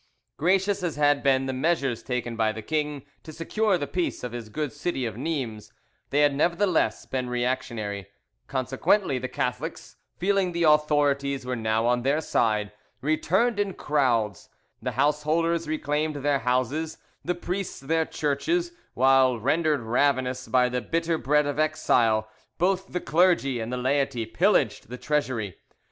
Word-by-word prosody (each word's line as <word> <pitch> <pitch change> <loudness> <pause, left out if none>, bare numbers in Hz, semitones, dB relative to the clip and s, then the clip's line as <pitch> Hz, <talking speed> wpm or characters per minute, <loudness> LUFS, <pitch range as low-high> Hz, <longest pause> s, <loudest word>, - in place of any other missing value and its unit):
Gracious 190 +5 +2
as 175 -3 -2
had 145 -1 +3
been 135 -1 +2
the 130 - -2
measures 135 -4 0
taken 120 -2 -3
by 110 -1 +1
the 110 0 -7
king 150 -1 -2 0.2
to 155 - -10
secure 195 +5 0
the 145 - -3
peace 175 -2 -2
of 125 - -4
his 115 -2 -7
good 150 +4 -3
city 145 -3 -2
of 110 -3 -4
Nimes, 125 -6 -4 0.4
they 145 - +2
had 145 -1 +4
nevertheless 170 - +1
been 130 -1 -3
reactionary; 120 -5 -2 0.4
consequently 135 - +1
the 130 - -3
Catholics, 125 +6 -4 0.2
feeling 190 -1 +1
the 170 0 0
authorities 145 -3 +2
were 125 0 -2
now 110 0 0
on 120 0 +2
their 140 +5 +1
side, 105 -8 0 0.3
returned 190 - +1
in 200 -2 -1
crowds: 120 - 0 0.3
the 125 +1 -3
householders 155 +5 +1
reclaimed 155 0 -1
their 145 0 +1
houses, 130 +6 -1 0.3
the 180 - -1
priests 180 +2 -4
their 160 +4 0
churches; 340 - -1 0.2
while, 130 -1 +4
rendered 150 +3 +1
ravenous 130 +2 0
by 125 -1 +3
the 125 0 -2
bitter 165 +1 -1
bread 150 +4 +2
of 145 +1 -3
exile, 120 -8 +2 0.3
both 190 +2 +1
the 180 - -4
clergy 160 -7 +2
and 115 +1 -4
the 125 - -2
laity 130 -2 0
pillaged 115 - +1
the 125 - -6
treasury. 125 - -2
140 Hz, 155 wpm, -26 LUFS, 125-160 Hz, 0.4 s, had